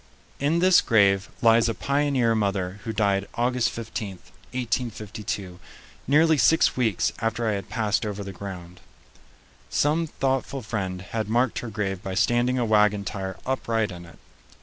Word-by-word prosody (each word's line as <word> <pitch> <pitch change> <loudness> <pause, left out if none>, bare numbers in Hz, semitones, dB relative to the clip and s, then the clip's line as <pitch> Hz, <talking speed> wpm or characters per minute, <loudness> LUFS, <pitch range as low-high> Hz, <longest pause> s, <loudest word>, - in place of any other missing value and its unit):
In 145 +4 +1
this 185 +1 +5
grave 100 -3 +3
lies 115 0 +5
a 115 - -2
pioneer 140 -4 +1
mother 100 -3 -1
who 115 - -2
died 100 -2 +1
August 125 0 +1
15, 110 -3 -5 0.4
1852, 110 -6 -4 0.5
nearly 155 +2 +4
six 160 - +4
weeks 115 -7 +1
after 115 +1 -1
I - - +2
had 100 -2 -4
passed 110 -3 0
over 105 -1 -4
the 100 0 -7
ground. 90 -2 -8 0.9
Some 160 +3 +1
thoughtful 135 -2 -2
friend 95 -4 -3
had 110 +3 -4
marked 120 +2 +1
her 120 - -6
grave 95 -3 -3
by 95 -1 -5
standing 120 +4 +2
a 120 - +1
wagon 105 -2 +3
tire 95 -1 -4
upright 115 -5 -1
in 85 -1 -9
it. 85 - -16
110 Hz, 150 wpm, -25 LUFS, 100-125 Hz, 0.9 s, this